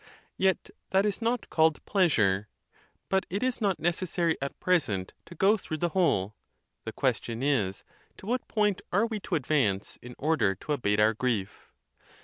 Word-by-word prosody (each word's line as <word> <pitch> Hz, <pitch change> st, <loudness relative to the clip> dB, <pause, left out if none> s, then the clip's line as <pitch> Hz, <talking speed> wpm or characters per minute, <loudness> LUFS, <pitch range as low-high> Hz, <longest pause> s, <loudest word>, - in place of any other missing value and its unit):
Yet 190 Hz, -1 st, +1 dB, 0.2 s
that 190 Hz, +2 st, +3 dB
is 210 Hz, +2 st, -1 dB
not 230 Hz, 0 st, -1 dB
called 160 Hz, -1 st, +2 dB
pleasure. 110 Hz, -, +2 dB, 0.6 s
But 190 Hz, 0 st, 0 dB
it 200 Hz, +6 st, -2 dB
is 255 Hz, -2 st, -1 dB
not 195 Hz, -4 st, +1 dB
necessary 170 Hz, -1 st, 0 dB
at 140 Hz, -, -5 dB
present 115 Hz, -, 0 dB
to 170 Hz, -, -12 dB
go 200 Hz, +6 st, +4 dB
through 155 Hz, -5 st, -5 dB
the 175 Hz, +2 st, 0 dB
whole:. 150 Hz, -, +1 dB, 0.5 s
the -, -, -3 dB
question 115 Hz, +2 st, -1 dB
is, 110 Hz, -10 st, 0 dB, 0.3 s
to -, -, -12 dB
what 245 Hz, +4 st, -2 dB
point 210 Hz, -3 st, +1 dB
are 205 Hz, +5 st, +3 dB
we 220 Hz, -2 st, -3 dB
to 190 Hz, -, -3 dB
advance 125 Hz, -9 st, 0 dB
in 125 Hz, 0 st, -10 dB
order 125 Hz, -11 st, +1 dB
to 150 Hz, +10 st, -3 dB
abate 105 Hz, -7 st, 0 dB
our 110 Hz, +1 st, +5 dB
grief? 110 Hz, -4 st, -3 dB
160 Hz, 165 wpm, -28 LUFS, -, 0.6 s, our